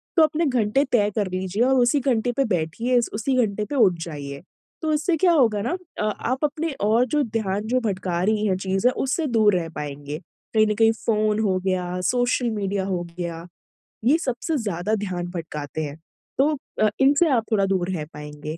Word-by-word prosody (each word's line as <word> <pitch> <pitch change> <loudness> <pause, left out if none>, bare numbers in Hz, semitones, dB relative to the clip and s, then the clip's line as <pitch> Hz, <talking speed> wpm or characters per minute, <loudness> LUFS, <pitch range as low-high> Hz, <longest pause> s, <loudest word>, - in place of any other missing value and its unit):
तो 325 - +6
अपने 315 +2 +2
घंटे 250 0 +2
तय 210 -3 +3
कर 205 -3 0
लीजिए 190 +4 -1
और 265 +1 +3
उसी 245 +4 +3
घंटे 245 -2 +1
पे 275 - +3
बैठिए, 215 +7 0
उस 235 - +1
उसी 240 +5 0
घंटे 210 +1 -3
पे 290 - -5
उठ 215 -9 +5
जाइए। 140 -4 -7 0.4
तो 315 -1 0
इससे 305 +3 +1
क्या 350 +2 +4
होगा 225 -10 +3
ना 330 - -1 0.2
अ, - - 0
आप 240 +6 -2
अपने 310 +2 -2
और 220 +4 +3
जो 295 +3 +1
ध्यान 210 -3 -2
जो 255 +3 +2
भटका 185 -5 -2
रहीं 215 +1 +1
है 185 - +2
चीज़ें, 190 +5 +1
उससे 280 +5 -1
दूर 215 -5 +3
रह 165 -2 -1
पाएँगे। 145 +1 -5 0.3
कहीं 215 -1 +4
न 210 - 0
कहीं 225 +1 +5
फ़ोन 215 -1 +2
हो 195 -4 +1
गया, 180 -1 -1
सोशल 245 +4 +1
मीडिया 200 -2 -2
हो 185 -3 -2
गया, 170 -1 -4 0.6
ये 285 +6 +5
सबसे 285 +1 -2
ज़्यादा 210 -1 -1
ध्यान 185 -4 -3
भटकाते 155 -3 -5
हैं। 145 +1 -6 0.4
तो 295 +3 +3 0.3
अ, 215 - +5
इनसे 290 +5 +5
आप 245 -5 +2
थोड़ा 200 -3 +3
दूर 190 -2 0
रह 160 -5 -3
पाएँगे। 150 +1 -7
215 Hz, 195 wpm, -23 LUFS, 180-250 Hz, 0.6 s, तो